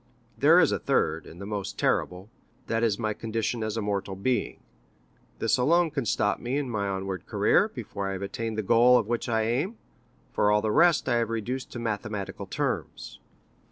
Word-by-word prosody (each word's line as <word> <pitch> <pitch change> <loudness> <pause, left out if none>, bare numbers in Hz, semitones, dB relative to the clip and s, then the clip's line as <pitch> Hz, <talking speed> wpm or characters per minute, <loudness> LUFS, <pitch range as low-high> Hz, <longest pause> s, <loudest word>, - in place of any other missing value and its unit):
There - - +6
is - - +4
a - - 0
third, 80 0 0
and 85 - -12
the 100 - -7
most 100 -2 -4
terrible—that 105 +4 -2
is 110 -4 +1
my 110 -2 -1
condition 115 +1 -3
as 110 0 -3
a 110 - -1
mortal 100 -1 -2
being. 120 +6 -1 0.8
This 115 +4 +1
alone 165 +5 +3
can 140 -6 -2
stop 105 +1 +1
me 125 +3 -2
in 140 -4 -2
my 100 -3 -1
onward 95 -2 -4
career, - - +3
before 100 -1 -5
I - - -3
have 95 +1 -5
attained 110 +2 -4
the 110 - -1
goal 120 +5 +5
at 115 - +1
which 120 +2 -2
I 110 -1 +1
aim, 135 - -1 0.5
for 105 - +2
all 105 0 +3
the 110 - +1
rest 170 +3 +4
I 120 -2 +2
have 115 -1 0
reduced 120 +3 -4
to - - -5
mathematical 110 -3 -4
terms. - - -4
110 Hz, 190 wpm, -27 LUFS, 100-120 Hz, 0.8 s, There